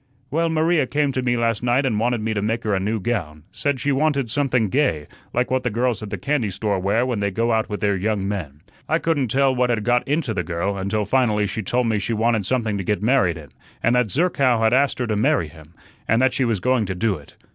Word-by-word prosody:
"Well, 165 +3 +1
Maria 160 -2 +2
came 145 0 0
to 130 - -2
me 120 -1 0
last 115 -2 0
night 125 +3 +2
and 110 -5 0
wanted 120 0 0
me 110 +1 -1
to 100 - -1
make 115 +3 -1
her 105 - 0
a 95 - +1
new 105 +3 -1
gown, 85 -9 -3
said 145 -3 -2
she 145 - 0
wanted 140 -4 +1
something 125 -6 +1
gay, 90 - +1 0.3
like 125 +1 -1
what 130 0 +1
the 125 - -1
girls 120 +1 -1
at 105 - -6
the - - -4
candy 140 -6 -1
store 100 +1 -1
wear 100 +6 +1
when 125 -4 -2
they 100 0 0
go 115 +4 0
out 110 -1 0
with 105 - -4
their 100 -2 +2
young 100 0 -1
men. 80 -8 -5 0.3
I 160 - +3
couldn't 160 -6 0
tell 135 +3 +2
what 125 -1 +1
had 115 -3 0
got 120 +2 +1
into 145 -5 0
the - - -1
girl, 90 +3 -2
until 100 +2 -1
finally 105 -2 +2
she 110 +2 -3
told 120 +5 0
me 110 -2 +1
she 115 - -2
wanted 110 -2 +1
something 110 -5 0
to - - -3
get 105 +2 -1
married 110 -9 +2
in, 75 -3 -11 0.3
and 115 - +3
that 125 -3 +2
Zerkow 140 - +2
had 110 +1 +3
asked 140 +1 +2
her 125 - -1
to 110 -2 -1
marry 85 -6 +1
him, 80 +2 -16 0.3
and 115 - +3
that 130 0 +3
she 130 - +1
was 115 -4 0
going 125 +1 +1
to 95 - -3
do 100 0 0
it. 70 - -17
115 Hz, 260 wpm, -22 LUFS, 100-130 Hz, 0.3 s, I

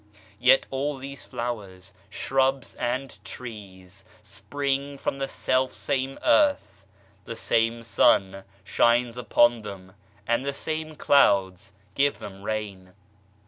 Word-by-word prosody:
Yet 130 +2 +5
all 140 +2 -2
these 140 +1 -9
flowers, 100 -7 -6 0.2
shrubs 135 0 0
and 130 +2 -4
trees 95 -5 -9 0.2
spring 140 0 -3
from 135 - -3
the 135 - -1
self 130 0 0
same 135 -1 -2
earth, 285 - +2 0.4
the 115 - -6
same 115 +1 0
sun 95 -3 +2 0.2
shines 120 +3 +2
upon 120 -1 +3
them 95 -3 -9 0.3
and 120 +3 +1
the 140 0 -2
same 155 +2 -4
clouds 95 -10 +3 0.2
give 140 +1 +2
them 95 -1 -10
rain. 100 -3 -5
120 Hz, 115 wpm, -25 LUFS, 100-135 Hz, 0.4 s, Yet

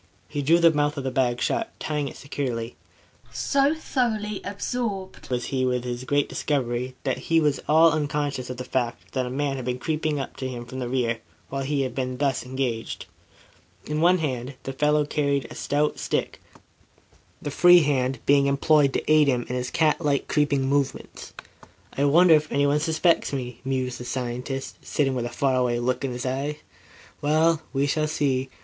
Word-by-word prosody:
He 145 - -3
drew 160 +5 +4
the 170 -1 +6
mouth 145 -1 0
of 140 - -3
the 130 - -2
bag 125 -2 +1
shut, 225 - 0
tying 150 -2 -2
it - - -8
securely. 125 -5 -4 0.6
So 280 +2 +2
thoroughly 220 -9 -1
absorbed 200 -1 -4
was 125 -1 -1
he 130 -1 +1
with 125 -1 0
his 125 0 -4
great 145 +1 +1
discovery, 125 -3 -2
that 130 -2 -1
he 165 0 +5
was 150 -3 +1
all 160 +2 +6
unconscious 145 -4 -2
of 125 - -5
the 125 - -4
fact 120 -2 -3
that 130 -2 -1
a - - -4
man 135 +1 -1
had 130 - -5
been 125 0 -1
creeping 155 +1 -1
up 135 - -6
to 130 - -3
him 120 -2 -6
from 130 +2 -7
the 125 -2 -3
rear 120 -3 0 0.3
while 135 0 -3
he 140 +1 0
had 130 -2 -3
been 130 -1 -3
thus 135 -4 0
engaged. 125 -3 -3 0.8
In 150 +1 -2
one 180 +2 +5
hand 130 -4 -3
the 135 - -5
fellow 150 +2 +2
carried 140 -3 0
a - - -8
stout 150 +2 0
stick, - - -2 1.0
the 145 - -5
free 175 +3 +7
hand 135 -2 +1
being 140 0 +4
employed 140 0 +3
to - - -1
aid 155 -1 +5
him 125 -3 +1
in 125 - -2
his 125 0 -2
cat 160 +1 +2
like 140 -2 +1
creeping 145 -2 +1
movements. 140 0 -2 0.6
"I 140 - +1
wonder 165 +4 +6
if 155 0 +3
anyoue 145 +1 +2
suspects," 160 +2 +2 0.3
mused 130 -2 -2
the 125 - -7
scientist, 125 +2 -4
sitting 135 -3 0
with 125 -2 -2
a - - -6
far 135 +2 0
away 125 -1 +1
look 125 +2 -1
in 135 - -1
his 125 +1 -5
eyes. 135 +3 -2 0.7
"Well, 155 +2 +3
we 135 +1 +1
shall 155 +2 0
see. 135 -3 0
140 Hz, 190 wpm, -25 LUFS, 130-150 Hz, 1.0 s, free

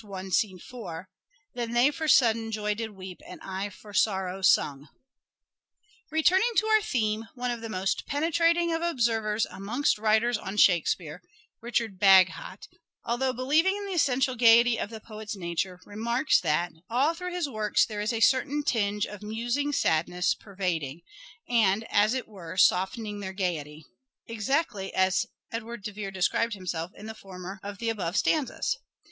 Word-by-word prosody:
4): 185 -5 -9
— - - -48
" 295 0 -43
Then 235 -1 -4
they 245 +4 +4
for 315 +1 -4
sudden 225 -5 +4
joy 210 -1 -1
did 220 +1 -4
weep 185 -1 -9
And - - -10
I 195 +1 -4
for 205 +1 -14
sorrow 190 -2 0
sung." 145 -6 +2 1.2
Returning 360 +8 +3
to 435 - +3
our 435 0 +4
theme, 225 - -1
one 250 -1 -2
of 235 -1 -5
the 225 - -6
most 195 -1 -2
penetrating 335 +3 +2
of 325 - -1
observers 225 -9 +1
amongst 215 +6 -1
writers 220 +2 +2
on 195 +1 -6
Shakespeare, 175 -5 +2 0.4
Richard 230 -4 -2
Bagehot, 190 0 +4 0.4
although 255 +3 0
believing 305 - +2
in 410 - -6
the 395 - -4
essential 265 -5 +2
gaiety 235 0 +5
of - - -3
the 220 -1 -9
poet's 215 0 -7
nature, 180 0 -3
remarks 235 +7 +1
that 170 +1 0 0.2
"all 265 +7 +2
through 360 +1 -6
his 355 -4 -1
works 215 -5 +1
there 210 -2 -5
is 210 +3 0
a 225 -1 -2
certain 280 +4 +3
tinge 210 -6 0
of 210 -1 -9
musing 240 +7 -2
sadness 180 - +1
per 200 -2 -16
vading, 165 -6 -2 0.4
and 220 -3 +2
as 210 +4 +3
it 255 - -3
were 185 -5 -9
softening 205 +3 +2
their 190 -1 -5
gaiety," 155 -5 -3 0.4
exactly 230 -2 -1
as 190 +4 +2 0.2
Edward 230 -1 -6
de 210 - -4
Vere 205 -1 -5
described 195 +4 0
himself 175 -3 -4
in 210 - -11
the 220 - -6
former 190 -2 -9
of 200 0 -7
the 230 +2 -2
above 195 -4 -2
stanzas. 305 -5 0
220 Hz, 165 wpm, -27 LUFS, 190-250 Hz, 1.2 s, gaiety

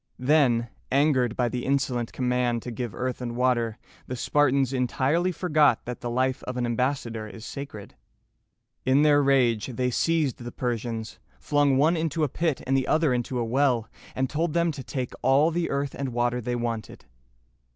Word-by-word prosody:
Then, 125 -4 +3 0.2
angered 130 -4 +2
by 125 - +1
the 125 +1 -3
insolent 130 -4 0
command 125 -2 0
to 125 - -5
give 120 -2 -5
earth 130 0 -3
and 120 -1 -4
water, 120 -3 +1 0.3
the 125 - -4
Spartans 135 0 +2
entirely 135 +7 +1
forgot 155 -8 +2
that 125 0 -6
the 120 - -3
life 130 +2 0
of 125 0 -4
an 125 - 0
ambassador 120 -2 -2
is 110 +1 -10
sacred. 140 - -8 0.9
In 135 +3 +4
their 145 -1 +5
rage, 125 -6 +2
they 125 0 -1
seized 160 0 +1
the 120 0 -7
Persians, 115 -3 -4 0.2
flung 145 -2 +2
one 155 +5 +4
into 160 -1 -1
a 150 - +1
pit 160 +1 -1
and 135 - +1
the 135 -1 +1
other 155 -4 +2
into 125 +1 -2
a 120 - 0
well, 125 -2 +1 0.3
and 130 0 0
told 155 +3 -1
them 170 -1 +2
to 140 -3 -7
take 125 -2 -4
all 140 +5 +4
the 170 +1 -1
earth 140 0 -2
and 135 -1 -3
water 120 0 0
they 120 +2 -2
wanted. 115 - -4
130 Hz, 180 wpm, -26 LUFS, 120-145 Hz, 0.9 s, their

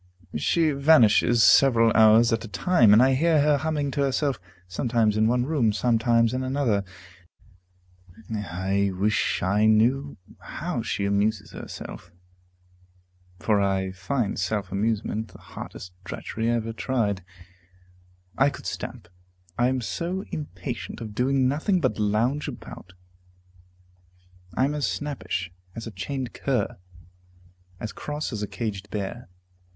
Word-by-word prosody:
She 160 - +2
vanishes 120 -6 +5
several 115 0 +6
hours 110 +1 +6
at 115 - -1
a - - -7
time, 115 - +3
and 110 +4 +7
I 135 0 +4
hear 160 +3 +3
her 150 0 +3
humming 145 -1 -1
to 140 - -1
herself, 140 -1 0 0.3
sometimes 110 +3 +1
in 110 0 +3
one 125 +1 +1
room, 135 -7 +2
sometimes 115 +1 +2
in 130 - -1
another. 130 -6 0 1.5
I 100 -1 -1
wish 105 +1 0
I 105 +4 +3
knew 125 +6 +2 0.2
how - - -4
she 100 - -2
amuses 100 +1 0
herself, 90 - -9 1.3
for 105 +1 +1
I 95 -1 0
find 100 +5 -2
self 95 0 -2
amusement 110 +1 -1
the 95 - -15
hardest 90 -1 -10
drudgery 115 +5 -3
I 120 - +2
ever 115 -1 -3
tried. 110 -6 -1 1.2
I 135 +2 +5
could - - -10
stamp, 115 -8 -6 0.5
I 120 0 +2
am 130 0 0
so 175 - -3
impatient 125 - -6
of 110 -3 -7
doing 130 +3 +2
nothing 160 +8 +1
but 130 -9 -1
lounge 115 +8 +1
about; 90 - -9 1.6
I 130 - +4
am 145 - -1
as 150 -1 -1
snappish 140 -11 -3 0.2
as 115 - -6
a 115 - -6
chained 130 +6 -4
cur, 125 -3 -1 1.0
as 110 - -5
cross 150 -2 -4
as 105 - -4
a 105 - -2
caged 100 -3 -5
bear. 105 +2 -5
115 Hz, 135 wpm, -25 LUFS, 105-135 Hz, 1.6 s, and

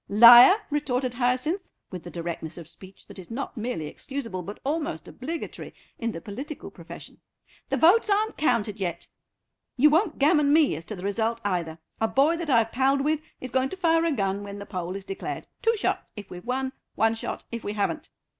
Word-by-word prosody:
"Liar!" 240 - +10 0.2
retorted 255 -4 -1
Hyacinth, 255 +9 -1 0.2
with 180 -2 -6
the 175 - -9
directness 170 -1 -5
of 170 -3 -9
speech 190 +3 -12
that - - -12
is 180 - -10
not 265 +4 -5
merely 225 -8 -3
excusable, 230 - -5
but 200 +4 -8
almost 290 - -2
obligatory, 320 +6 -6 0.2
in 230 -1 -1
the 165 - -6
political 270 - -7
profession; - - -11 0.5
"the - - 0
votes 385 +7 +5
aren't 425 +2 +1
counted 210 -8 0
yet. 175 -3 -3 0.7
You 295 +4 +6
won't 330 +1 +2
gammon 295 0 +4
me 305 - +4
as 160 +2 -8
to 215 - -6
the 180 - -9
result, 220 +3 -1
either. 170 -5 -1 0.2
A 225 - +2
boy 280 +8 +3
that 335 -2 -4
I've 230 -3 +3
palled 270 +2 +2
with 305 +2 +1 0.2
is 255 - -7
going 260 +1 +1
to 380 - -7
fire 330 -2 +3
a 335 - +2
gun 195 -6 -1
when 200 0 -7
the 200 - -7
poll 185 -2 -4
is 195 -1 -6
declared; 195 - -5 0.2
two 455 -1 +2
shots - - -2
if 205 -3 -9
we've 180 +5 -9
won, 260 +1 -1 0.2
one 225 +1 +3
shot 225 - -5
if 235 -1 -5
we 205 - -3
haven't." 210 +9 -2
240 Hz, 200 wpm, -26 LUFS, 200-295 Hz, 0.7 s, Liar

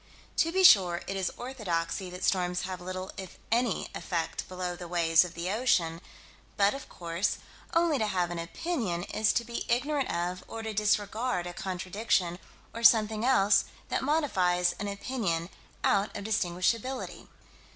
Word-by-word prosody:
To 330 - +3
be 380 +2 +2
sure 180 - +7
it 195 - -4
is 190 -2 0
orthodoxy 195 -7 -3
that 180 +1 -8
storms 180 -1 +1
have 185 -1 -5
little, 185 +1 -5
if 190 -2 -8
any, 235 +1 +1
effect 170 -3 -3
below 180 -1 -3
the 175 0 -8
waves 165 -1 +4
of 175 -1 -8
the 170 +2 -2
ocean 175 -8 +1 0.6
but 200 0 +4
of 275 0 -8
course 170 +2 -2 0.4
only 330 -4 +3
to 215 - +1
have 180 -3 0
an 175 - -3
opinion 180 - -2
is 215 +2 +1
to 235 - 0
be 235 0 -4
ignorant 275 +4 +1
of, 180 +1 -2
or 225 - -6
to 220 -1 -4
disregard 210 0 0
a 175 - -5
contradiction, 185 -1 -1 0.3
or 230 - -6
something 215 -1 +5
else 215 -6 +4 0.2
that - - 0
modifies 185 - +2
an 205 - -3
opinion 200 -5 -2 0.3
out 200 +1 +2
of - - -6
distinguishability. 215 +5 -1
195 Hz, 160 wpm, -29 LUFS, 175-230 Hz, 0.6 s, sure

